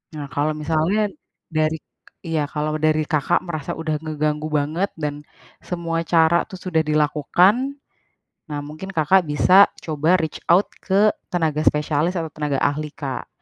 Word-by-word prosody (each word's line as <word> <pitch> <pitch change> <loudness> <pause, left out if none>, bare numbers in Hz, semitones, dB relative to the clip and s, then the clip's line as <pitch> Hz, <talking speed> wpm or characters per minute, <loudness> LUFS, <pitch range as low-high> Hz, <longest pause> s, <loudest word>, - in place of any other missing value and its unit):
Nah, 145 -2 -7
kalau 150 +2 0
misalnya 165 +7 0 0.4
dari 155 0 +1 0.5
iya, 160 -3 -1
kalau 155 +1 -2
dari 155 0 +2
Kakak 150 -2 0
merasa 155 -5 -4
udah 155 -2 -2
ngeganggu 155 -1 -2
banget, 155 +6 0
dan, 150 -1 -4 0.4
semua 170 -2 -3
cara 165 0 +4
itu 200 - -9
sudah 180 -4 0
dilakukan. 165 - +2 0.8
Nah, 145 - -2
mungkin 155 +6 -8
Kakak 180 +2 +3
bisa 180 +7 +6 0.2
coba 155 +2 +2
reach 160 -2 -3
out 185 +4 +5
ke 205 +2 +3 0.2
tenaga 160 -4 0
spesialis, 150 +4 +1
atau, 165 - -3
tenaga 145 -3 -2
ahli, 150 +1 0
Kak. 135 -4 -5
155 Hz, 145 wpm, -22 LUFS, 150-170 Hz, 0.8 s, bisa